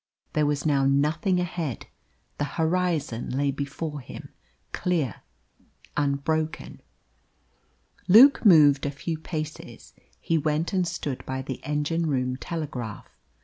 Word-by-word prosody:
There 150 -1 +2
was 145 -1 -1
now 140 -3 +2
nothing 155 +7 +2
ahead; 170 -7 -3 0.5
the - - +1
horizon 160 -7 0
lay 140 0 +1
before 145 +2 -5
him, 125 - -10 0.4
clear, 160 - -1 0.8
unbroken. 150 +3 -1 1.3
Luke 240 +9 +8
moved 150 - +6
a - - 0
few 155 +3 -4
paces. 155 -1 -7 0.3
He 165 -1 0
went 155 +4 -1
and 185 -2 +1
stood 160 -6 -4
by 130 0 -3
the 130 -1 -6
engine 150 +3 -1
room 125 -3 0
telegraph. 130 -8 -6
150 Hz, 115 wpm, -26 LUFS, 140-165 Hz, 1.3 s, Luke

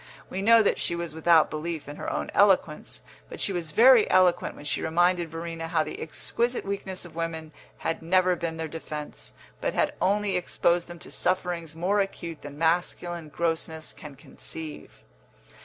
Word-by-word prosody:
We 190 - -2
know 230 +2 +6
that - - +1
she 170 - 0
was 170 -2 -4
without 160 0 +4
belief 155 0 -4
in 145 - -8
her - - -4
own - - -3
eloquence, 190 -6 +2 0.3
but 470 - -8
she 195 - +1
was 170 -3 -3
very 230 +6 +6
eloquent 180 -2 +3
when 145 - -11
she - - 0
reminded 175 +1 +2
Verena 165 0 -5
how 165 -1 +1
the 155 - -7
exquisite 235 +9 -2
weakness 195 -2 -4
of 170 - -13
women 160 -2 -4 0.2
had 165 - -2
never 180 +2 +3
been 165 -1 -4
their 160 0 -3
defence, 150 -1 -7 0.3
but - - -1
had - - +2
only 200 0 +2
exposed 175 -1 +1
them 175 - -9
to - - -10
sufferings 175 -3 -1
more 185 +5 +1
acute 170 -5 -3
than 145 0 -9
masculine 170 0 0
grossness 160 0 -2
can 150 -3 -11
conceive. 155 +3 -9
170 Hz, 175 wpm, -27 LUFS, 160-185 Hz, 0.3 s, know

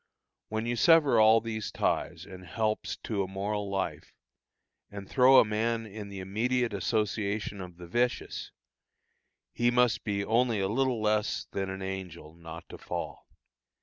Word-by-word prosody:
When 110 +1 -2
you 120 0 -1
sever 160 -1 +5
all 110 +1 +6
these 110 -1 -4
ties 85 - -1
and 95 -1 -11
helps 100 +1 -2
to 105 -3 -1
a 95 - -2
moral 100 +1 -3
life, 95 -1 -4 0.7
and 100 -1 -8
throw 130 0 +6
a - - +8
man 115 +2 -1
in 105 -1 -8
the 100 - -8
immediate 115 +5 -1
association 105 0 -1
of 90 -2 -9
the 90 - -10
vicious, 120 +8 -1 1.0
he 120 0 +2
must 125 -1 +2
be 100 -2 -1
only 115 -1 +2
a 95 - +1
little 120 +1 0
less 105 0 0
than 95 -1 -2
an 95 0 -5
angel 90 -5 -6
not 85 -1 -10
to - - -10
fall. - - -6
105 Hz, 155 wpm, -29 LUFS, 95-115 Hz, 1.0 s, a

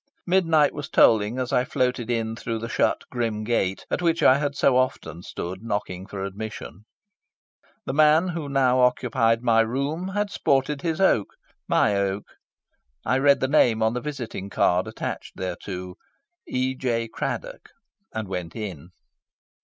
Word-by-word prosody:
Midnight 165 -5 +3
was 145 -2 -6
tolling 110 +2 +4
as 130 -1 -2
I 125 - +3
floated 125 -2 -1
in 115 -1 -1
through 115 0 -4
the 115 +1 -5
shut - - +1
grim 115 -3 -2
gate 100 -4 -1
at - - 0
which 165 -1 +1
I 130 +2 +6
had 145 -1 -2
so 135 - +3
often 85 -10 -1
stood 95 +1 -6
knocking 100 -4 -4
for 100 -2 -5
admission. 100 -2 -7 1.0
The - - -3
man 155 +4 +4
who 165 -4 -4
now 130 -2 +3
occupied 120 -2 +2
my 115 -2 +4
room 140 +10 -2
had 205 +1 -2
sported 140 -2 +1
his 165 0 -2
oak 150 - +3 0.4
my 105 - +3
oak. 100 0 -1 0.8
I 130 - +2
read 140 0 +4
the 130 - +2
name 120 -6 +3
on 110 +1 +2
the 125 - -3
visiting 120 -9 -5
card 90 -1 +2
attached - - -6
thereto 90 0 -5 0.5
E. 130 +1 -1
J. 120 -3 -1
Craddock - - -5 0.4
and 110 -2 -4
went 90 -3 -5
in. 90 -8 -6
120 Hz, 155 wpm, -24 LUFS, 105-140 Hz, 1.0 s, I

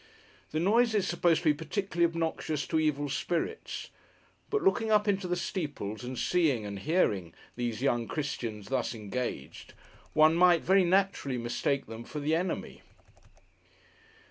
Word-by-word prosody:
The 155 - -2
noise 220 +6 +3
is 195 -3 +1
supposed 175 -1 +2
to 160 - +4
be - - +5
particularly 170 +2 -1
obnoxious 160 -3 -2
to 160 - 0
Evil 145 -2 0
Spirits; 175 - -3 0.6
but 425 -3 0
looking 240 - +2
up 210 -1 +3
into 195 -2 +1
the 180 - 0
steeples, 145 - -4
and 125 +1 -5
seeing 145 -11 +1
(and 100 -1 -5
hearing) 100 - 0 0.2
these 120 0 -3
young 120 -4 +1
Christians 115 -8 -4
thus 130 -2 -1
engaged, 115 +4 -5 0.4
one 155 +1 +6
might 175 0 +5
very 190 0 +4
naturally 185 -8 +1
mistake 120 +4 -1
them 115 +1 -8
for 150 - -6
the 150 +2 0
Enemy. 175 +2 -2
155 Hz, 145 wpm, -30 LUFS, 125-180 Hz, 0.6 s, one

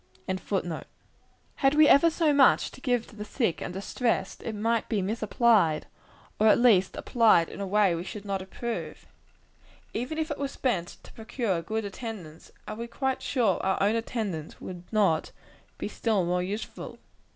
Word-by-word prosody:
] 125 0 -30 1.3
Had 270 +1 +3
we 305 0 +7
ever 315 +4 +6
so 320 -2 +2
much 280 -2 +6
money - - -4
to 260 - -14
give 245 -3 0
to 220 - -16
the 210 - -6
sick 215 - -1
and - - -4
distressed, 200 +6 -2
it 225 - -5
might 225 +2 0
be 220 - +1
misapplied; 210 -4 +2 0.5
or, 215 - +4
at 215 - +6
least, 220 -6 +4
applied 220 -8 +4
in - - -8
a 200 - -3
way 200 -2 +3
we 170 +1 -3
should 205 +2 -8
not 195 -1 -2
approve. 230 +5 -5 0.9
Even 250 +7 -3
if 315 -1 -2
it 290 - -4
were 280 - -1
spent 240 -10 -2
to - - -15
procure 220 -5 -2
good 220 +5 -3
attendance, 200 -6 -8 0.2
are 215 - -5
we 235 +1 -5
quite 265 +2 -2
sure 230 -9 +1
our 190 0 +1
own 205 +3 +2
attendance 215 -9 -4
would 180 -1 -9
not 195 -8 +2 0.5
be - - -4
still 215 -6 0
more 180 +1 0
useful? 200 +5 -5
215 Hz, 175 wpm, -27 LUFS, 190-240 Hz, 1.3 s, we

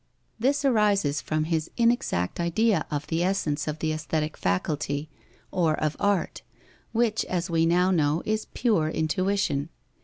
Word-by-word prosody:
This 280 +4 +1
arises 205 - +2
from 155 0 -1
his 160 0 -1
inexact 230 - +1
idea 195 +6 +1
of 145 -1 -3
the 165 +1 -1
essence 165 -6 0
of 155 0 -2
the 155 0 -1
aesthetic 155 0 -2
faculty 145 +10 -2 0.4
or 165 -4 +2
of 155 -1 -1
art, 200 -3 0 0.5
which, 225 -2 +1
as 180 0 -2
we 165 0 +3
now 180 +2 +3
know, 155 -2 +1
is 215 0 -1
pure 210 -11 +2
intuition. 165 -2 0
165 Hz, 145 wpm, -26 LUFS, 155-205 Hz, 0.5 s, we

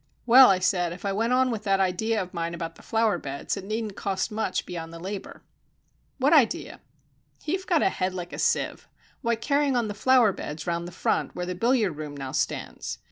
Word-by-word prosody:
"Well," 255 +2 +9
I 190 - +4
said, 180 -2 +1
"if 190 - -10
I 200 - 0
went 225 +4 0
on 255 0 +3
with 220 -2 -4
that 195 -1 +2
idea 205 +4 +1
of 185 -2 -5
mine 170 -1 -3
about 165 -1 -5
the - - -17
flower 220 -5 +1
beds 140 -1 -4
it 195 - -6
needn't 215 0 -3
cost 195 +2 -2
much 215 -3 -2
beyond 165 -2 -6
the 165 - -9
labour." 190 +3 -7 0.7
"What 280 +4 +3
idea?" 310 +3 +2 0.7
"You've 370 +4 -2
got 335 -4 +3
a - - +4
head 185 0 -1
like 175 -1 -6
a - - -6
sieve. - - 0 0.3
Why, 235 -3 +1
carrying 280 +3 +1
on 235 -3 0
the - - -3
flower 235 0 +4
beds 150 -2 -6
round 170 0 -2
the - - -8
front - - -1
where 180 - -3
the 180 - -3
billiard 215 - +1
room 150 -2 -6
now 135 -1 -5
stands. 150 - -3
200 Hz, 215 wpm, -26 LUFS, 175-235 Hz, 0.7 s, Well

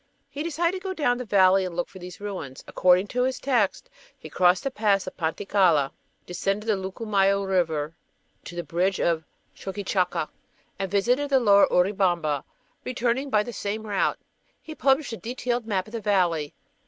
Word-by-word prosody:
He 285 - -5
decided 335 +3 -1
to - - -17
go 380 -1 -3
down 245 -7 +1
the 250 - -4
valley 190 -2 +4
and 180 -2 -5
look 175 - -1
for 190 - -13
these 180 0 -10
ruins. 190 -10 -6
According 180 +1 +3
to 250 - -1
his 260 +1 0
text 245 - 0 0.3
he - - -11
crossed 180 0 +3
the 275 - -2
Pass 205 -4 +1
of 185 - -7
Panticalla, 165 -3 +2 0.3
descended 195 +4 -2
the 215 - +3
Lucumayo 195 0 0
River 160 -5 0 0.5
to 175 - -8
the 175 - -3
bridge 175 +5 0
of 165 -2 +1 0.3
Choqquechacca, 190 -4 -2 0.5
and 195 -1 -2
visited 245 +9 +1
the 270 -1 +4
lower 200 -4 +6
Urubamba, 180 -6 +1 0.4
returning 250 +2 -1
by 210 -4 +3
the 240 - -7
same 215 +1 -4
route. 205 -2 0 0.4
He 315 - -9
published 275 -3 +1
a - - -4
detailed 240 0 -3
map 190 -4 0
of 215 - -14
the 230 - -3
valley. 175 -7 +1
200 Hz, 175 wpm, -25 LUFS, 180-240 Hz, 0.5 s, lower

